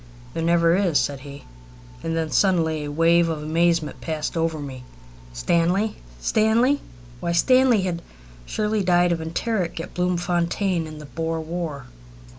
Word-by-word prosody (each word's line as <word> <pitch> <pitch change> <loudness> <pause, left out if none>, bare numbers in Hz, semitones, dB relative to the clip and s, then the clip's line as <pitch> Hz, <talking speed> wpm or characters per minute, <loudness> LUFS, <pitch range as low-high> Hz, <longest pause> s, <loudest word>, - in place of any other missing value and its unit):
"There 165 - -3
never 170 0 +3
is," 180 -6 +2
said 140 -2 -1
he. 140 +1 -10 0.6
And 165 0 -1
then 160 -1 -2
suddenly 160 -6 +2
a 145 - -5
wave 165 +2 +4
of 155 -2 -3
amazement 165 0 +1
passed 155 -1 -3
over 165 -1 0
me. 135 -4 -7 0.5
Stanley! 170 - +1 0.2
Stanley! 225 - +2 0.4
Why, 170 +4 -1
Stanley 255 +3 +4
had 175 -2 -2 0.5
surely 215 0 0
died 175 -1 +3
of 165 -1 -1
enteric 175 +2 -2
at 165 - -7
Bloemfontein 175 0 0
in 155 0 -9
the 150 - -9
Boer 160 +4 -3
War! 160 -4 -4
170 Hz, 145 wpm, -23 LUFS, 160-180 Hz, 0.6 s, wave